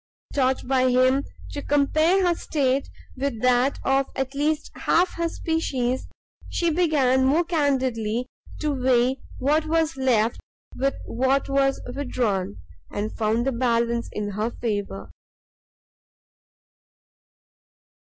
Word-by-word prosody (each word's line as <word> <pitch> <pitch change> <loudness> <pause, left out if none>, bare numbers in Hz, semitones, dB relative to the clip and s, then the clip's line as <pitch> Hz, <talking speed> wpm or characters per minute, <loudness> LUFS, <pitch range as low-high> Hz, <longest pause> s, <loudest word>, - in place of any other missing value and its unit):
Taught 265 -2 +1
by 255 -1 +3
him 255 +2 +3 0.3
to 285 - -4
compare 310 +7 +2
her 350 - +3
state 275 -5 0 0.3
with 265 -4 -2
that 250 +2 +3
of 270 0 +2
at 265 0 -2
least 300 +2 -1
half 355 +2 +1
her 335 0 -1
species, 260 -7 -1 0.4
she 340 -1 0
began 290 -6 +3
more 290 +6 +3
candidly 260 -8 0 0.4
to 305 -1 0
weigh 255 0 +2 0.2
what 305 +4 +1
was 325 -1 +1
left 235 -4 +2 0.4
with 275 +1 0
what 265 +3 +1
was 275 0 +2
withdrawn, 220 - -1 0.3
and 210 +1 -4
found 225 +2 0
the 270 - +1
balance 235 -1 0
in 210 -1 -3
her 210 +3 -1
favour. 205 - -4
265 Hz, 115 wpm, -24 LUFS, 240-290 Hz, 0.4 s, by